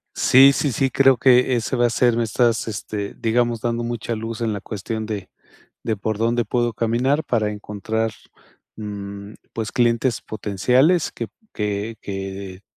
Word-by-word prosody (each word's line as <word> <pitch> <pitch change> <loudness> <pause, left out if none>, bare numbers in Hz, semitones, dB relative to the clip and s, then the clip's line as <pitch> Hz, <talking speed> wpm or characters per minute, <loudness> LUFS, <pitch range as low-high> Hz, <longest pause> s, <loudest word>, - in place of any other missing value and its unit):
Sí, 135 +2 +7
sí, 140 0 0
sí. 135 +3 0
Creo 135 0 +5
que 125 0 +4
ese 120 +2 -1
va 120 -1 +3
a - - -1
ser 120 0 +2
Me 120 - +2
estás, 115 +1 +1
este, 105 -1 -5
digamos, 120 0 0
dando 120 0 -1
mucha 120 -1 -3
luz, 115 +1 -5
en 115 -2 0
la 100 - -5
cuestión 110 +1 -4
de 100 -4 -5 0.5
de, 110 -2 -1
por 110 +1 -2
dónde 115 +1 +1
puedo 120 0 0
caminar, 120 +7 +1
para 110 -3 0
encontrar, 105 +2 -3 0.7
mm, 100 -1 -7 0.2
pues, 110 -1 -3
clientes 120 +1 +1
potenciales, 125 - +1
que 115 - -4 0.3
que 105 +1 -3
que, 95 -1 -6
115 Hz, 160 wpm, -22 LUFS, 105-120 Hz, 0.7 s, Sí